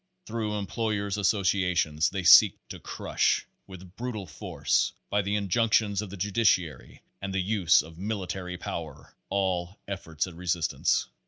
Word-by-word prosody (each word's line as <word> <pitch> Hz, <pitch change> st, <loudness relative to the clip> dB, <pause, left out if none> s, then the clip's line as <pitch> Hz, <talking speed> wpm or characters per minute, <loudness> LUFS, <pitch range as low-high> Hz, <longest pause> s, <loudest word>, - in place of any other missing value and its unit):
Through 110 Hz, -5 st, -3 dB
employers' 105 Hz, -1 st, -2 dB
associations, 90 Hz, -6 st, +1 dB
they 95 Hz, -1 st, -4 dB
seek -, -, +8 dB
to -, -, -8 dB
crush, -, -, 0 dB, 0.2 s
with 95 Hz, -1 st, -12 dB
brutal 115 Hz, -5 st, -4 dB
force, 75 Hz, -, -1 dB, 0.2 s
by 105 Hz, -, +2 dB
the 100 Hz, +1 st, -1 dB
injunctions 105 Hz, 0 st, +2 dB
of 105 Hz, -, -7 dB
the 100 Hz, -, -8 dB
judiciary 95 Hz, -, 0 dB, 0.2 s
and 100 Hz, 0 st, -4 dB
the -, -, +1 dB
use 95 Hz, -6 st, +3 dB
of 80 Hz, +1 st, -13 dB
military 95 Hz, -3 st, -4 dB
power, 80 Hz, -5 st, -7 dB
all 95 Hz, -2 st, -1 dB
efforts 80 Hz, -6 st, -3 dB
at 90 Hz, -, -10 dB
resistance. 85 Hz, -1 st, 0 dB
95 Hz, 140 wpm, -27 LUFS, 85-105 Hz, 0.2 s, seek